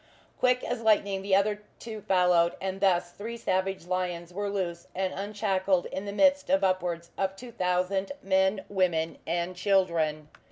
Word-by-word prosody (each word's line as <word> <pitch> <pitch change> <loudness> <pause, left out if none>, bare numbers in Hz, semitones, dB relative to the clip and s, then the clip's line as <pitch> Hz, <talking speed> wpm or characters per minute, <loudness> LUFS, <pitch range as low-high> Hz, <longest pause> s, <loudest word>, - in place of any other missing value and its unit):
Quick 250 0 +3
as 245 -1 -3
lightning 200 -3 +2
the 195 0 +2
other 205 +1 +1 0.2
two 220 -2 -7
followed, 180 -3 +3
and 190 0 -4
thus 175 -3 +2
three 230 +5 -6
savage 190 -4 -1
lions 180 -1 -3
were 205 +2 -2
loose 175 -4 -3
and 190 0 -1
unshackled 195 -2 0
in 190 - -4
the 200 - -4
midst 285 +6 +3
of 285 +1 +3
upwards 175 -3 0
of 190 0 0
two 240 +4 -10
thousand 185 0 0
men, 190 +1 +2
women 175 -4 0
and 175 +2 -1
children. 170 -6 +1
190 Hz, 160 wpm, -28 LUFS, 180-205 Hz, 0.2 s, Quick